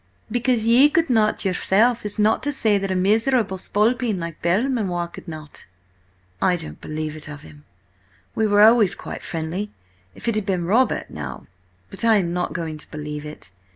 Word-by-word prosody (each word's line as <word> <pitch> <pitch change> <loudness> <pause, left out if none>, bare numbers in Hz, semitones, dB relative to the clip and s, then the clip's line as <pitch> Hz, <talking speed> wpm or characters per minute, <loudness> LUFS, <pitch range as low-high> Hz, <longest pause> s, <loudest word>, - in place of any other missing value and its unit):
"Because 240 -1 +1
ye 245 +6 +6
could 325 -2 +1
not 215 -3 +2
yourself, 210 +5 +2
is 210 - -8
not 215 +1 +3
to 290 - -2
say 220 -7 +1
that 195 0 -3
a 185 - 0
miserable 215 +1 +2
spalpeen 220 +2 +1
like 170 -2 -6
Belmanoir 190 -2 0
could 170 - -12
not." 155 -3 -10 0.7
"I 185 -1 +3
don't 165 -2 -6
believe 155 0 -4
it 155 -1 -7
of 150 -1 -9
him. 145 -2 -15 0.7
We 220 - +1
were 205 0 +5
always 220 -3 +5
quite - - -7
friendly–if 160 - -7
it 230 - +2
had 215 -1 -2
been 180 -3 0
Robert 230 +9 +1
now— - - -7 0.5
But - - -7
I 225 -1 +5
am 175 -4 +1
not 180 0 -1
going 160 -3 -4
to - - -14
believe 150 -1 -6
it. 150 -11 -10
195 Hz, 180 wpm, -22 LUFS, 165-225 Hz, 0.7 s, ye